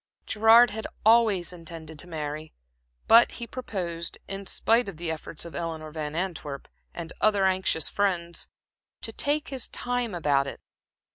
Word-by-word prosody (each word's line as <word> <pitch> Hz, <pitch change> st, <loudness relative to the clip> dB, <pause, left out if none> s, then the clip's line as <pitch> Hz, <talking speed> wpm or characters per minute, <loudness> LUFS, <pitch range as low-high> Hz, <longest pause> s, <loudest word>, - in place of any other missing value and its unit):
Gerard 225 Hz, +2 st, +6 dB
had 220 Hz, +1 st, -4 dB, 0.2 s
always 215 Hz, -6 st, +4 dB
intended 160 Hz, -2 st, -9 dB
to 180 Hz, -, -6 dB
marry, 155 Hz, -1 st, -5 dB, 0.5 s
but 230 Hz, +1 st, +7 dB
he 235 Hz, -, -6 dB
proposed, 180 Hz, -9 st, -4 dB
in 195 Hz, 0 st, -5 dB
spite 230 Hz, +2 st, +2 dB
of 180 Hz, -, -9 dB
the 165 Hz, 0 st, -3 dB
efforts 160 Hz, +1 st, -7 dB
of 170 Hz, -, -9 dB
Eleanor 160 Hz, -2 st, -4 dB
Van 150 Hz, -1 st, -4 dB
Antwerp 160 Hz, -6 st, -4 dB, 0.2 s
and 165 Hz, -1 st, -7 dB
other 205 Hz, -2 st, +4 dB
anxious 185 Hz, -4 st, +1 dB
friends, 175 Hz, -4 st, -1 dB, 0.5 s
to -, -, -4 dB
take 295 Hz, +1 st, +1 dB
his 265 Hz, -3 st, -2 dB
time 245 Hz, -4 st, -2 dB
about 145 Hz, -4 st, +2 dB
it. -, -, -6 dB
175 Hz, 150 wpm, -27 LUFS, 160-220 Hz, 0.5 s, but